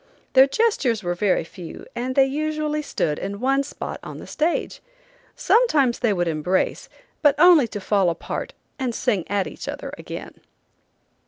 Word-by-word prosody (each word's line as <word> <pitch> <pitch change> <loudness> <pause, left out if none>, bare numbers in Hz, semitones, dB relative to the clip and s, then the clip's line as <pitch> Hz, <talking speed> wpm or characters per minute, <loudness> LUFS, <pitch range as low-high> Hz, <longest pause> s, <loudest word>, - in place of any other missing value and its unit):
Their 265 +1 +7
gestures 275 - +1
were 175 0 -1
very 185 -1 +1
few, 170 +1 -10
and 255 +2 -3
they 270 - +6
usually 305 +2 -1
stood 155 - -2
in 200 +1 -5
one 270 +3 +2
spot 280 - -6
on - - -8
the - - -9
stage. 320 +3 -1 0.5
Sometimes 295 - +3
they 235 -4 +2
would 175 -3 0
embrace, 165 +4 -1 0.3
but 290 -2 +5
only 335 -7 +7
to 210 - -6
fall 195 -2 +2
apart 170 - -4 0.3
and 250 -3 -2
sing 205 -9 0
at 200 -2 +1
each - - -8
other - - -6
again. - - -8
250 Hz, 160 wpm, -23 LUFS, 195-290 Hz, 0.5 s, Their